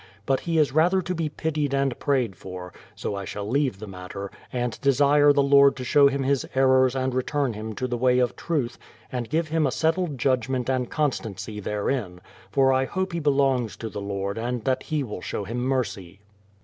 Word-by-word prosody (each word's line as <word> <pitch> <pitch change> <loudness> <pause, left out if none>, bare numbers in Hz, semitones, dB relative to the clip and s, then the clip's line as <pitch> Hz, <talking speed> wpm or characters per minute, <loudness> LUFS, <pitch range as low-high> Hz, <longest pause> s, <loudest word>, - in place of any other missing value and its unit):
But 135 -1 +2
he 165 -1 -2
is 150 -4 +3
rather 175 +6 +3
to 180 - -2
be 165 -3 -2
pitied 150 -2 -1
and 135 -2 0
prayed 130 -8 0
for; 90 -1 -9 0.2
so - - -4
I 100 0 -4
shall 100 +2 -5
leave 130 -3 +1
the 110 - -8
matter, 95 0 -7 0.2
and 125 -2 -3
desire 145 +2 +5
the 140 -1 +3
Lord 140 0 +6
to 130 - -6
show 140 +3 +5
him 140 0 0
his 135 0 +1
errors 130 -1 +4
and 130 -1 -1
return 130 0 0
him 110 +1 -6
to 130 - -2
the 120 -1 -2
way 125 0 +3
of 125 -1 +1
truth, 145 -8 -2 0.3
and 120 -3 -3
give 160 +1 0
him 160 -2 +2
a - - -1
settled 160 -1 0
judgment 130 0 0
and 125 -2 -1
constancy 110 -8 -2
therein; 105 -2 -2 0.3
for 135 +4 +3
I 130 0 +2
hope 190 +4 -3
he 170 - -1
belongs 135 - +1
to 110 -1 -6
tlie 100 -1 -5
Lord 100 +1 -3
and 120 0 -3
that 130 +1 0
He 155 -2 -2
will 105 -7 -6
show 100 - -4
him 115 +5 -4
mercy. 120 -8 -2
130 Hz, 205 wpm, -25 LUFS, 110-145 Hz, 0.3 s, Lord